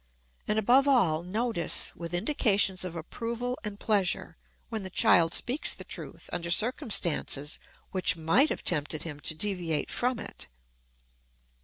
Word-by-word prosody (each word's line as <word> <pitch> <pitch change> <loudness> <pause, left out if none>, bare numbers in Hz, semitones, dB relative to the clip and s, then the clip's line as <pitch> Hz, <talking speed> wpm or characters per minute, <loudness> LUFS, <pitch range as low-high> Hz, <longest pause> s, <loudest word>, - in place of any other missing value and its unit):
And, 210 - 0
above 250 +6 +4
all, 185 - +3
notice, 200 -1 -1
with 170 +1 -5
indications 200 -4 +2
of 180 -2 -6
approval 235 +9 -4
and 210 -1 -6
pleasure, 200 -4 0 0.3
when 220 -3 -4
the 190 - -6
child 165 -2 +4
speaks 255 - +2
the - - -10
truth - - -4
under 170 0 -3
circumstances 170 - 0 0.3
which 185 -2 +3
might 195 - +3
have - - -4
tempted 150 -2 0
him 150 -3 -7
to 160 - -1
deviate 170 -5 -2
from 250 0 -1
it. - - -9
190 Hz, 140 wpm, -28 LUFS, 165-230 Hz, 0.3 s, above